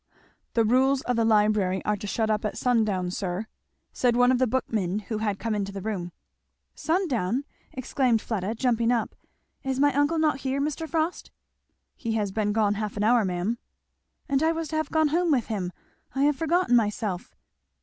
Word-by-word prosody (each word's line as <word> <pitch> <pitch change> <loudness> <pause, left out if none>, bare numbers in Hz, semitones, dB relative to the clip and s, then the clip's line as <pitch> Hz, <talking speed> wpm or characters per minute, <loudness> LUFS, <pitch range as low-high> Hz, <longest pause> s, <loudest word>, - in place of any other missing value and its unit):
"The 230 -1 +4
rules 260 +4 +3
of 250 - 0
the 230 - +2
library 210 -4 +2
are 210 - +2
to 205 - -6
shut 220 +2 0
up 210 -1 0
at 210 - -3
sundown, 215 -7 +1
sir," 185 +2 -3 0.5
said 245 -2 +2
one 245 +1 +5
of 255 - +2
the 255 - +3
bookmen 215 -6 -1
who 215 +1 -4
had 210 -2 -1
come 225 +1 -2
into 200 -1 -2
the 195 - -6
room. 190 -5 -3 0.6
"Sundown!" 280 - 0 0.3
exclaimed 255 -2 +1
Fleda 215 -1 -3
jumping 235 -1 +1
up; 235 -2 0 0.5
"is 265 -1 -2
my 285 0 +4
uncle 290 +4 +2
not 305 -3 +2
here, 270 0 -1
Mr. 305 +3 -2
Frost?" 325 +1 -1 0.7
"He 230 - -3
has 210 -3 -1
been 210 0 0
gone 210 -1 +2
half 210 0 -4
an 205 - 0
hour, 235 +1 +4
ma'am." 190 +5 -1 0.7
"And 275 0 +1
I 320 +1 +3
was 325 -2 -4
to 315 - -4
have 315 - -1
gone 315 -1 +2
home 345 +3 +1
with 260 -7 +2
him 180 -4 -2 0.4
I 270 - +2
have 295 0 +3
forgotten 330 -3 +2
myself." 210 -4 -1
230 Hz, 190 wpm, -26 LUFS, 210-275 Hz, 0.7 s, one